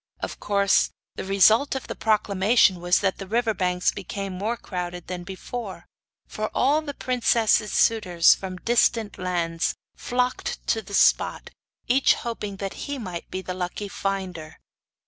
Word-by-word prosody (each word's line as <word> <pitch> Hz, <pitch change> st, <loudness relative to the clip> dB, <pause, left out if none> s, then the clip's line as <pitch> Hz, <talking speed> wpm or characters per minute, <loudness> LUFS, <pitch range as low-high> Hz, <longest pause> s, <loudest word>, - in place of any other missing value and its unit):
Of -, -, -5 dB
course 200 Hz, -1 st, +2 dB, 0.2 s
the -, -, -6 dB
result 215 Hz, +8 st, +4 dB
of 265 Hz, -, -4 dB
the -, -, -5 dB
proclamation 205 Hz, -2 st, +3 dB
was 175 Hz, +1 st, +2 dB
that 195 Hz, -2 st, 0 dB
the 195 Hz, -, -7 dB
river 230 Hz, +2 st, +1 dB
banks 180 Hz, -2 st, +1 dB
became 195 Hz, 0 st, -5 dB
more 210 Hz, +6 st, -2 dB
crowded 180 Hz, -3 st, -5 dB
than 180 Hz, 0 st, -5 dB
before; 190 Hz, 0 st, -7 dB, 0.4 s
for 215 Hz, 0 st, -4 dB
all 290 Hz, +5 st, +3 dB
the 285 Hz, -3 st, -7 dB
princess's 230 Hz, -3 st, +2 dB
suitors 180 Hz, -7 st, +4 dB
from 185 Hz, -1 st, -6 dB
distant 230 Hz, 0 st, +1 dB
lands 170 Hz, -2 st, -1 dB, 0.2 s
flocked 250 Hz, +1 st, -2 dB
to 225 Hz, -, +2 dB
the 200 Hz, 0 st, -6 dB
spot, -, -, +2 dB, 0.4 s
each 260 Hz, +3 st, +4 dB
hoping 210 Hz, -4 st, -5 dB
that 195 Hz, 0 st, -4 dB, 0.2 s
he 285 Hz, -, -2 dB
might 180 Hz, -8 st, -6 dB
be 190 Hz, -, -5 dB
the 185 Hz, -, -4 dB
lucky 180 Hz, +3 st, -4 dB
finder. 185 Hz, -6 st, -4 dB
200 Hz, 150 wpm, -24 LUFS, 180-230 Hz, 0.4 s, result